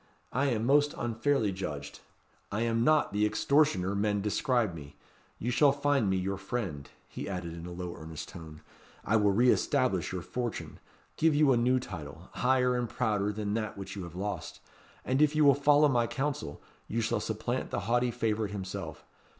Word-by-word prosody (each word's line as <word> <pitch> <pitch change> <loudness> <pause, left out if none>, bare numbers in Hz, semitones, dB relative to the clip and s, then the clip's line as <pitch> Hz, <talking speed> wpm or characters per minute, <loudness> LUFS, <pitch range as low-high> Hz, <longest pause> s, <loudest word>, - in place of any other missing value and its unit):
I 135 +4 +1
am 115 -4 0
most 145 +3 +3
unfairly 115 -1 0
judged. 75 -7 -6 0.5
I 105 +3 -1
am 115 0 +1
not 155 -3 +3
the 105 +1 +1
extortioner 105 -2 +2
men 105 0 +1
describe 110 - +1
me. 75 -3 -10 0.4
You 120 - -2
shall 140 +3 +5
find 140 -5 +1
me 95 - +2
your 95 +1 -2
friend," 95 - -4 0.2
he - - -6
added 90 -3 -4
in 85 +1 -8
a - - -7
low 90 0 -5
earnest 80 0 -8
tone. 80 -2 -10 0.4
"I 110 - +3
will 105 -1 +3
re 120 +5 +5
establish 95 -9 +1
your 90 -2 -4
fortune; 120 +2 -4 0.4
give 160 -1 +3
you 145 -2 +5
a - - +5
new 125 +2 +3
title, 85 -5 -8
higher 125 0 +2
and 120 -2 -1
prouder 105 -4 0
than 105 -1 -3
that 110 -2 -3
which 100 0 -7
you 100 - -5
have 85 -1 -8
lost; 100 +2 -4 0.5
and, 130 +3 +1
if 150 0 +4
you 155 -1 +4
will 140 - +8
follow 145 +2 +5
my 120 -4 +2
counsel, 135 - -3 0.2
you 115 - -2
shall 110 - 0
supplant - - -3
the - - -2
haughty 120 +2 +1
favourite 110 -3 -1
himself. 95 -2 -6
110 Hz, 185 wpm, -30 LUFS, 95-130 Hz, 0.5 s, will